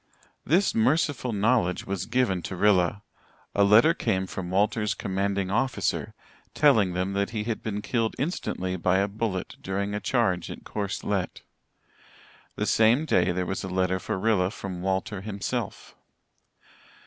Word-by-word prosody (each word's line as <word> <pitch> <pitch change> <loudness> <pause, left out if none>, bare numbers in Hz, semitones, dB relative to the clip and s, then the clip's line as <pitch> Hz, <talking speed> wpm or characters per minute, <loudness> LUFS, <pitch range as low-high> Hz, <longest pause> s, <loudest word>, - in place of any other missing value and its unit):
This 180 +7 +3
merciful 130 +1 +1
knowledge 105 -3 +1
was 95 -2 -3
given 110 -8 +1
to 95 - -5
Rilla. 100 +1 +2 0.5
A 100 - +3
letter 110 +11 +6
came 95 - -1
from 90 -1 -6
Walter's 105 +3 +1
commanding 95 0 -1
officer, 130 +5 -1 0.4
telling 110 -12 +4
them 90 +2 -1
that 100 0 0
he 110 -2 -3
had 115 0 -3
been 105 -1 -4
killed 115 -3 -1
instantly 95 - -2
by 90 +1 +2
a 100 +1 +2
bullet 100 -2 -3
during 100 +2 -2
a 105 - -1
charge 95 -9 0
at - - -8
Courcelette. 100 -2 -3 1.1
The - - -1
same 115 +7 +4
day 90 - +2
there 90 +1 -1
was 95 - -3
a - - -4
letter 95 0 0
for 90 - -3
Rilla 95 -2 +2
from 95 -3 -6
Walter 95 +1 -2
himself. 100 -1 -4
100 Hz, 150 wpm, -26 LUFS, 95-110 Hz, 1.1 s, letter